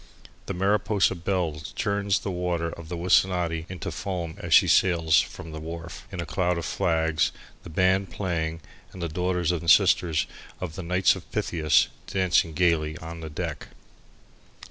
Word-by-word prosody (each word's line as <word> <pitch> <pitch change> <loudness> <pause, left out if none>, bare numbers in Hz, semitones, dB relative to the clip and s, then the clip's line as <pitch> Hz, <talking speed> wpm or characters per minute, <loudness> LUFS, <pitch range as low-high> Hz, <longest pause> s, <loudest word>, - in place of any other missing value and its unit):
The - - -3
Mariposa 100 +1 +2
Belle 85 -3 -2
churns 100 -2 +1
the 100 - -3
waters 90 -2 -2
of 85 -2 -11
the 85 - -4
Wissanotti 85 -2 +2
into 95 -1 -5
foam 90 -4 -4
as - - -6
she - - +7
sails 85 -4 +4
out - - -6
from 80 - -9
the 80 - -6
wharf, 85 +2 -8
in 90 - -6
a 85 - -2
cloud 90 +2 0
of 85 - -3
flags, 80 0 +1 0.3
the - - -11
band 95 +3 +2
playing 85 -4 -3 0.3
and 95 - -10
the - - 0
daughters 90 +1 0
and 85 -1 -2
sisters 75 0 +4 0.3
of 90 -4 -5
the 95 - -6
Knights 90 +2 +3
of - - -11
Pythias 75 -3 +2 0.2
dancing 95 -4 +2
gaily 80 -2 +1
on 80 +1 -8
the 80 -1 -7
deck. 75 - -5
85 Hz, 165 wpm, -26 LUFS, 80-95 Hz, 0.3 s, she